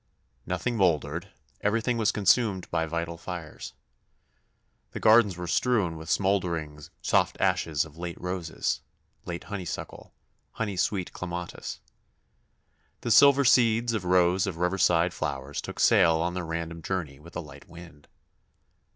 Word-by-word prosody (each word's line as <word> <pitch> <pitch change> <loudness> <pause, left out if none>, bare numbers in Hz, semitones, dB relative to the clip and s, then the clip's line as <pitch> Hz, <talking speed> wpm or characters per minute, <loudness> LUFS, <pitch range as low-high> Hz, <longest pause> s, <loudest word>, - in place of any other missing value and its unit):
Nothing 120 -2 -2
mouldered 85 -1 0 0.3
everything 115 +3 +1
was 110 0 +3
consumed 105 -2 +2
by 80 - 0
vital 85 +1 -4
fires. 85 -5 -7 1.2
The - - -4
gardens 110 -4 +5
were 90 - -5
strewn 100 -2 +1
with 80 +1 -9
smouldering 85 -6 0 0.2
soft - - +2
ashes 75 -3 +1
of 80 +1 -15
late 85 -1 -5
roses, 90 -3 -3 0.4
late 85 -1 -5
honeysuckle, 95 -5 -7 0.4
honey 105 -3 -3
sweet 90 0 -1
clematis. 90 -1 -6 1.2
The 120 - -2
silver 140 +3 +7
seeds 120 -1 +4
of 110 -4 -2
rows 90 +1 +3
of - - -4
riverside 90 -1 +2
flowers 70 +1 -4
took - - -8
sail 80 -1 +5
on 85 +2 -1
their 90 -2 -4
random 85 0 -4
journey 80 -6 -4
with 85 +3 -15
a - - -2
light 75 -4 -11
wind. 85 -4 -13
90 Hz, 135 wpm, -27 LUFS, 80-100 Hz, 1.2 s, silver